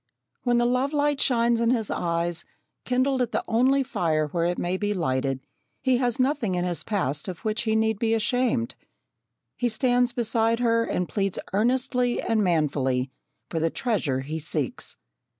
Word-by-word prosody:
When 245 Hz, -1 st, +2 dB
the 240 Hz, -, +3 dB
love 255 Hz, +4 st, +1 dB
light 290 Hz, -1 st, +1 dB
shines 235 Hz, -2 st, +3 dB
in 230 Hz, -, +2 dB
his 230 Hz, -4 st, 0 dB
eyes, 170 Hz, 0 st, -1 dB, 0.4 s
kindled 255 Hz, +1 st, +1 dB
at 240 Hz, -2 st, -1 dB
the -, -, 0 dB
only 260 Hz, +4 st, +3 dB
fire 160 Hz, -10 st, 0 dB
where 170 Hz, +2 st, 0 dB
it 175 Hz, +1 st, 0 dB
may 175 Hz, +1 st, -1 dB
be 205 Hz, +2 st, -1 dB
lighted, 135 Hz, -5 st, -1 dB, 0.4 s
he 260 Hz, -2 st, +2 dB
has 245 Hz, -1 st, 0 dB
nothing 255 Hz, -7 st, +1 dB
in 175 Hz, 0 st, 0 dB
his 175 Hz, -2 st, -2 dB
past 150 Hz, -, -2 dB
of 185 Hz, +4 st, -7 dB
which 215 Hz, 0 st, 0 dB
he 220 Hz, -, +2 dB
need 220 Hz, -1 st, +1 dB
be 225 Hz, 0 st, +2 dB
ashamed. 240 Hz, +2 st, 0 dB, 0.8 s
He 245 Hz, -, 0 dB
stands 245 Hz, +1 st, +2 dB
beside 230 Hz, -1 st, +1 dB
her 230 Hz, -1 st, +3 dB
and 180 Hz, -, -1 dB
pleads 195 Hz, -3 st, -1 dB, 0.2 s
earnestly 245 Hz, +3 st, +1 dB
and 225 Hz, -2 st, +1 dB
manfully 140 Hz, -7 st, +1 dB, 0.4 s
for 165 Hz, -, -2 dB
the 165 Hz, +1 st, +1 dB
treasure 165 Hz, -, -1 dB
he 155 Hz, +4 st, -4 dB
seeks. 150 Hz, -4 st, -3 dB
220 Hz, 170 wpm, -25 LUFS, 170-245 Hz, 0.8 s, the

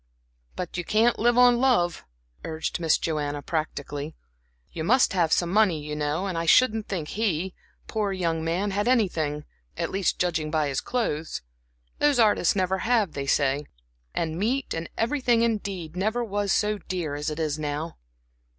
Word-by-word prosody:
"But 180 Hz, -1 st, -5 dB
you 175 Hz, -, -2 dB
can't 225 Hz, +6 st, +2 dB
live 240 Hz, +2 st, +3 dB
on 245 Hz, -1 st, +6 dB
love," 205 Hz, -10 st, +2 dB, 0.4 s
urged 160 Hz, +2 st, -3 dB
Miss 165 Hz, -2 st, +3 dB
Joanna, 145 Hz, -2 st, -2 dB
practically. 150 Hz, -1 st, -4 dB, 0.6 s
"You 160 Hz, -, -4 dB
must 245 Hz, +7 st, +4 dB
have 170 Hz, -4 st, +2 dB
some 175 Hz, -1 st, +2 dB
money, 200 Hz, -6 st, +3 dB
you 150 Hz, 0 st, -5 dB
know, 150 Hz, +5 st, -1 dB
and 180 Hz, -4 st, -2 dB
I 165 Hz, -, -3 dB
shouldn't 225 Hz, +1 st, +4 dB
think 170 Hz, -6 st, -3 dB
he, 190 Hz, -4 st, -1 dB, 0.3 s
poor 210 Hz, -3 st, -1 dB
young 165 Hz, -4 st, -1 dB
man, 180 Hz, +5 st, -1 dB
had 205 Hz, +3 st, -1 dB
anything 160 Hz, -12 st, +1 dB, 0.3 s
at -, -, -2 dB
least, 195 Hz, -1 st, 0 dB
judging 165 Hz, -4 st, 0 dB
by 155 Hz, -2 st, +1 dB
his 135 Hz, -, -1 dB
clothes. 165 Hz, -, -2 dB, 0.6 s
Those 290 Hz, -2 st, +3 dB
artists 210 Hz, -6 st, +4 dB
never 190 Hz, 0 st, +1 dB
have, 225 Hz, -6 st, +2 dB
they 140 Hz, -1 st, -4 dB
say. 140 Hz, +1 st, +1 dB, 0.5 s
And 160 Hz, 0 st, -2 dB
meat, 255 Hz, +7 st, 0 dB
and 165 Hz, +1 st, -4 dB
everything 240 Hz, -1 st, +2 dB
indeed, 195 Hz, -7 st, -2 dB
never 215 Hz, +6 st, 0 dB
was 205 Hz, -2 st, -1 dB
so 210 Hz, -1 st, +1 dB
dear 175 Hz, -5 st, -4 dB
as 145 Hz, +1 st, -2 dB
it 150 Hz, +1 st, -5 dB
is 155 Hz, -1 st, -1 dB
now." 150 Hz, +2 st, -3 dB
180 Hz, 170 wpm, -26 LUFS, 155-215 Hz, 0.6 s, on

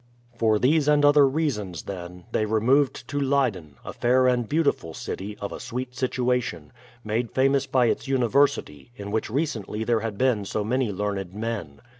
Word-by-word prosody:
For 110 Hz, -2 st, +2 dB
these 145 Hz, +6 st, +2 dB
and 150 Hz, -1 st, +4 dB
other 145 Hz, -1 st, +6 dB
reasons, 130 Hz, -, -2 dB
then, 90 Hz, -2 st, -8 dB
they 110 Hz, -, 0 dB
removed 125 Hz, +4 st, +2 dB
to 145 Hz, -, -2 dB
Leyden, 125 Hz, -, 0 dB
a -, -, -6 dB
fair 130 Hz, +2 st, +3 dB
and 125 Hz, -3 st, +1 dB
beautiful 145 Hz, -, 0 dB
city, 105 Hz, +2 st, -6 dB
of 100 Hz, -, -5 dB
a -, -, -6 dB
sweet 125 Hz, +1 st, -5 dB
situation, 125 Hz, -, -1 dB, 0.3 s
made 110 Hz, +2 st, -1 dB
famous 135 Hz, +1 st, +2 dB
by 130 Hz, -2 st, +3 dB
its 115 Hz, -, -1 dB
university, 125 Hz, -, +1 dB
in 100 Hz, -2 st, -7 dB
which 110 Hz, +1 st, -1 dB
recently 115 Hz, -6 st, -2 dB
there 115 Hz, 0 st, +1 dB
had 110 Hz, -2 st, -4 dB
been 125 Hz, -4 st, +2 dB
so 105 Hz, +1 st, -2 dB
many 125 Hz, +1 st, 0 dB
learned 100 Hz, -2 st, -3 dB
men. 105 Hz, -10 st, -5 dB
120 Hz, 170 wpm, -25 LUFS, 105-135 Hz, 0.3 s, other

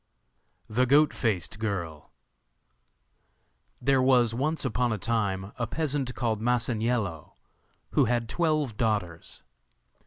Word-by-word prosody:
The 125 Hz, +4 st, +1 dB
Goat 145 Hz, +4 st, +5 dB
faced 110 Hz, -3 st, -2 dB
Girl 85 Hz, -8 st, -4 dB, 1.7 s
There 135 Hz, -1 st, +3 dB
was 125 Hz, -3 st, +4 dB
once 150 Hz, +5 st, -1 dB
upon 125 Hz, -1 st, 0 dB
a 110 Hz, -, -1 dB
time 100 Hz, -2 st, -1 dB
a 120 Hz, -, -1 dB
peasant 140 Hz, -3 st, -2 dB
called 110 Hz, -3 st, -1 dB
Masaniello 115 Hz, -, -1 dB, 0.6 s
who -, -, +3 dB
had 120 Hz, 0 st, 0 dB
twelve 155 Hz, -6 st, 0 dB
daughters. 100 Hz, -, -2 dB
115 Hz, 105 wpm, -27 LUFS, 105-130 Hz, 1.7 s, Goat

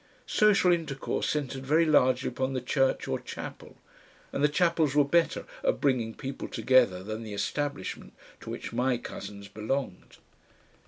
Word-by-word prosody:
Social 205 Hz, -4 st, +4 dB
intercourse 160 Hz, -6 st, -1 dB
centred 135 Hz, -3 st, -2 dB
very 155 Hz, +5 st, +3 dB
largely 130 Hz, -4 st, +3 dB
upon 130 Hz, 0 st, -2 dB
the 130 Hz, -, 0 dB
church 135 Hz, +2 st, +1 dB
or -, -, -1 dB
chapel, -, -, -8 dB, 0.6 s
and 140 Hz, -, -1 dB
the 150 Hz, -, +5 dB
chapels 165 Hz, -3 st, +2 dB
were 145 Hz, -1 st, +5 dB
better 170 Hz, +4 st, +1 dB, 0.2 s
at -, -, +1 dB
bringing 120 Hz, -5 st, +1 dB
people 135 Hz, 0 st, -6 dB
together 120 Hz, -9 st, +3 dB
than 110 Hz, +2 st, -5 dB
the 110 Hz, -2 st, -6 dB
Establishment 145 Hz, -1 st, -3 dB, 0.2 s
to -, -, -10 dB
which -, -, -6 dB
my 125 Hz, +1 st, +1 dB
cousins 100 Hz, -3 st, -8 dB
belonged. 110 Hz, 0 st, -4 dB
135 Hz, 150 wpm, -28 LUFS, 115-150 Hz, 0.6 s, the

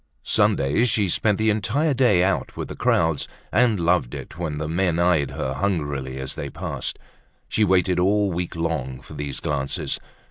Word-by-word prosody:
Sundays 70 Hz, -, +2 dB
she 100 Hz, -3 st, +1 dB
spent 105 Hz, +3 st, +2 dB
the 110 Hz, 0 st, +3 dB
entire 135 Hz, +9 st, +1 dB
day 120 Hz, -9 st, +4 dB
out 95 Hz, +1 st, -1 dB
with -, -, -4 dB
the -, -, -6 dB
crowds 80 Hz, -3 st, +1 dB, 0.2 s
and 115 Hz, -5 st, +3 dB
loved 85 Hz, -7 st, +1 dB
it -, -, -8 dB
when 80 Hz, -3 st, -3 dB
the 75 Hz, 0 st, -3 dB
men 85 Hz, +1 st, +1 dB
eyed 85 Hz, -5 st, +3 dB
her 65 Hz, -, -3 dB
hungrily 70 Hz, -6 st, -2 dB
as 65 Hz, 0 st, -4 dB
they -, -, -5 dB
passed. -, -, -4 dB, 0.5 s
She 110 Hz, -, +1 dB
waited 95 Hz, -2 st, +3 dB
all 100 Hz, +2 st, +2 dB
week 90 Hz, 0 st, -3 dB
long 75 Hz, -6 st, -2 dB
for -, -, -12 dB
these 70 Hz, -2 st, -4 dB
glances. 70 Hz, -2 st, -2 dB
85 Hz, 175 wpm, -23 LUFS, 75-100 Hz, 0.5 s, day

